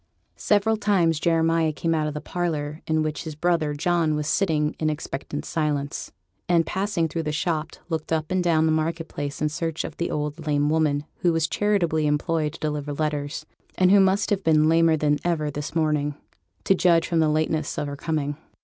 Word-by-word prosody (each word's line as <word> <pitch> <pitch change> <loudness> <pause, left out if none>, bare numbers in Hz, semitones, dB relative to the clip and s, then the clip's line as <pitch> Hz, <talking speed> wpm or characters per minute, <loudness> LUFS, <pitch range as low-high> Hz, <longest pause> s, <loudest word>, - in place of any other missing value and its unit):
Several 220 +1 +2
times 185 -7 +2
Jeremiah 165 -1 +2
came 165 +2 -1
out 155 -1 0
of 150 - -4
the 150 - -4
parlour 155 -3 -3
in 155 0 +1
which 155 -1 -3
his 160 -2 -6
brother 160 -2 0
John 165 0 +1
was 150 0 -2
sitting 155 -3 +1
in 155 - +1
expectant 145 -1 -5
silence, 145 -3 -2 0.4
and, 170 -2 +4
passing 190 -4 -1
through 165 +1 -3
the 150 -1 -2
shop, 155 +1 -2
looked 160 -3 -4
up 160 0 -1
and 185 -1 +1
down 160 -2 +3
the 160 - +3
market 160 +1 -1
place 145 0 -5
in 150 - +2
search 165 +1 -3
of - - -7
the 170 - -2
old 150 +2 -4
lame 145 0 +2
woman, 150 -2 +1
who 175 - +2
was 165 -1 +1
charitably 170 -8 +1
employed 150 +1 0
to - - -10
deliver 150 -1 -3
letters, 150 0 -2 0.3
and 185 0 +4
who 200 - +7
must 195 +2 +2
have 195 -1 +1
been 155 -1 +4
lamer 165 0 +4
than 150 -1 +1
ever 155 -4 0
this 145 +2 -6
morning, 150 -2 +1 0.5
to - - +4
judge 170 -3 +3
from 170 -2 +1
the 160 -1 +3
lateness 155 0 0
of - - -1
her 145 0 -5
coming. 145 -1 -2
155 Hz, 200 wpm, -24 LUFS, 150-170 Hz, 0.5 s, who